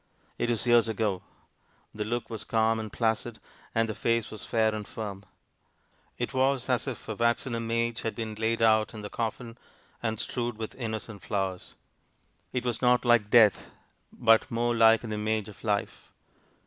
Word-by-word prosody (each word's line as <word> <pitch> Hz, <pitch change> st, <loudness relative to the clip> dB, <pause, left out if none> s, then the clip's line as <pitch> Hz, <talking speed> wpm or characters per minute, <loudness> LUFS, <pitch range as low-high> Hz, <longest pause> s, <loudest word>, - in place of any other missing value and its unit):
It 120 Hz, -, 0 dB
is 115 Hz, -1 st, 0 dB
years 120 Hz, -1 st, +5 dB
ago. 105 Hz, -4 st, -1 dB, 0.7 s
The 105 Hz, 0 st, -3 dB
look 115 Hz, +2 st, -3 dB
was 110 Hz, -, -5 dB
calm 110 Hz, 0 st, +1 dB
and 110 Hz, -2 st, -5 dB
placid, 115 Hz, 0 st, -1 dB, 0.4 s
and 115 Hz, 0 st, +2 dB
the 110 Hz, -, -3 dB
face 115 Hz, +1 st, 0 dB
was 110 Hz, -, -7 dB
fair 110 Hz, -1 st, +1 dB
and 105 Hz, -1 st, -5 dB
firm. 100 Hz, -3 st, -6 dB, 0.9 s
It -, -, -3 dB
was 130 Hz, 0 st, +1 dB
as 125 Hz, +2 st, +1 dB
if 130 Hz, -, -6 dB
a 110 Hz, -, -2 dB
waxen 115 Hz, +3 st, 0 dB
image 115 Hz, 0 st, -1 dB
had 115 Hz, -, -3 dB
been 110 Hz, -2 st, -4 dB
laid 115 Hz, +1 st, 0 dB
out 110 Hz, 0 st, +3 dB
in 105 Hz, -, -7 dB
the 105 Hz, -, -7 dB
coffin, 115 Hz, +1 st, -4 dB, 0.4 s
and 110 Hz, -2 st, -2 dB
strewed 120 Hz, -2 st, -3 dB
with 110 Hz, -1 st, -5 dB
innocent 110 Hz, -4 st, -5 dB
flowers. 95 Hz, -1 st, -3 dB, 0.8 s
It 125 Hz, -1 st, -2 dB
was 120 Hz, -2 st, -2 dB
not 125 Hz, 0 st, +3 dB
like 120 Hz, -3 st, +4 dB
death, 110 Hz, -4 st, +5 dB, 0.4 s
but 115 Hz, -2 st, +4 dB
more 120 Hz, +1 st, 0 dB
like 115 Hz, 0 st, +5 dB
an 110 Hz, -2 st, -4 dB
image 110 Hz, 0 st, -1 dB
of 105 Hz, -, -13 dB
life! 105 Hz, -2 st, -2 dB
115 Hz, 175 wpm, -28 LUFS, 110-120 Hz, 0.9 s, years